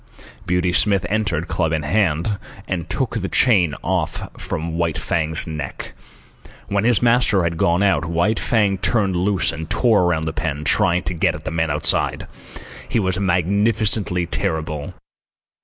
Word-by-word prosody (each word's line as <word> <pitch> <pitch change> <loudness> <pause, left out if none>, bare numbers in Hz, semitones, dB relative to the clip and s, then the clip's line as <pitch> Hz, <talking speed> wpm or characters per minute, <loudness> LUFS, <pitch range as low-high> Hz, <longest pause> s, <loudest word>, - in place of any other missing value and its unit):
Beauty 90 0 +1
Smith 100 -2 +3
entered, 95 -6 -1
club 80 -3 -1
in 80 -2 -1
hand, 95 +3 0 0.3
and 85 -4 -4
took - - -1
the - - -3
chain 90 - +3
off - - -2
from 80 +1 -4
White 85 -3 0
Fang's 80 -1 -2
neck. 80 -2 -6 0.8
When 100 +1 0
his 120 -1 +2
master 115 -5 +3
had 85 0 -1
gone 85 +3 +1
out, 95 -4 +2
White 85 +6 0
Fang 105 -4 +1
turned 95 0 +1
loose 95 0 +2
and 80 0 -7
tore 115 -6 +3
around 80 -2 0
the 80 0 -3
pen, 75 -2 -3
trying 90 0 +2
to 85 +4 -3
get 85 - +1
at 75 - -10
the - - -3
men 80 -1 -1
outside. 75 +2 +1 0.6
He - - 0
was 95 -4 0
magnificently 100 0 +2
terrible. 80 -5 -3
90 Hz, 155 wpm, -20 LUFS, 80-100 Hz, 0.8 s, Smith